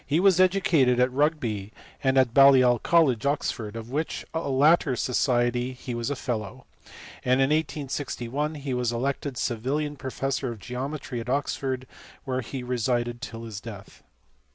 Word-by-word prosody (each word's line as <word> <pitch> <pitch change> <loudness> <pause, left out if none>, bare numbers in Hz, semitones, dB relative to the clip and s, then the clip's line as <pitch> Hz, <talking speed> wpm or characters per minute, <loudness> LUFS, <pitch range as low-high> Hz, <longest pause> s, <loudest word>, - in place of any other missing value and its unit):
459 160 +5 +2
was 190 -3 +5
educated 175 -9 +3
at 125 +1 +3
Rugby, 125 -8 0 0.3
and 135 0 +2
at 130 -3 +4
Balliol 130 -3 +6
College, 145 -10 +3
Oxford, 115 -6 -2
of 115 +1 -7
which 155 +4 -3
latter 150 -1 +3
society 120 0 +1
he 125 0 -7
was 120 +2 -2
a 145 - -1
fellow; 110 -6 -4 0.6
and 125 - +2
in 135 +2 +3
1861 145 -2 -2
he 140 -2 -4
was 125 -1 0
elected 135 +3 -2
Savilian 135 +6 -1
professor 135 -1 -3
of 115 - -7
geometry 130 +3 -5
at 115 - -6
Oxford, 135 -1 -1 0.4
where 130 -1 -2
he 130 +2 -6
resided 120 -1 -1
till 115 -1 -7
his 110 -4 -7
death. 100 -4 -10
130 Hz, 150 wpm, -26 LUFS, 120-145 Hz, 0.6 s, Balliol